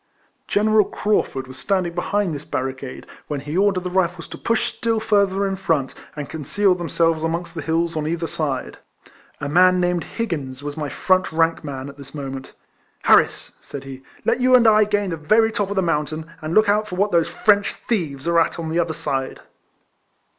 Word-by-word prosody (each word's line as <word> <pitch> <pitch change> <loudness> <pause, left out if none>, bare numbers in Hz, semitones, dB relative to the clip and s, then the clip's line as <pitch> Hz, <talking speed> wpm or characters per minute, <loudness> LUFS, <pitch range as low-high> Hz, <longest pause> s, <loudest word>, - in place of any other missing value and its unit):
General 215 0 +3
Craufurd 170 -10 -1
was 130 0 -11
standing 185 -2 0
behind 185 +1 0
this 145 0 -6
barricade, 130 -1 -4 0.2
Avhen 145 -2 -2
he 150 +2 -5
ordered 190 -1 +2
the 180 - -4
Rifles 180 -2 0
to - - -7
push 230 -1 0
still 225 -1 0
further 200 -2 +2
in 195 -1 -1
front, 165 -8 0 0.2
and 145 -2 -5
conceal 185 +6 +1
themselves 165 -2 0
amongst 165 +1 -2
the 165 - -5
hills 165 +2 0
on 155 -1 -1
either 165 +1 -1
side. 145 -5 -3 0.6
A 145 - -3
man 180 +4 +5
named 175 -1 +1
Higgins 145 - -4
was 145 0 -4
my 150 -2 -3
front 185 +5 +1
rank 165 +1 +1
man 135 -2 -5
at 140 0 -10
this 140 +1 -11
moment. 135 -2 -6 0.3
" - - -39
Harris," - - +4
said 140 - -8
he, 135 -1 -9
" - - -27
let - - +1
you 255 0 +6
and 240 -2 +6
I 215 -1 +6
gain 205 -2 0
the 165 - -3
very 220 +9 +3
top 205 -2 -1
of 200 - -3
the 190 - +2
mountain, 155 -1 -1 0.2
and 155 +1 -3
look 215 -1 +5
out 210 0 +1
what 200 +3 +1
those 170 -2 +2
French 205 -1 +2
thieves 160 - -3
are 170 0 +4
at 165 - +1
on 160 -1 -4
the 170 - +1
other 165 -2 0
side." 135 -3 -3
170 Hz, 200 wpm, -22 LUFS, 150-200 Hz, 0.6 s, you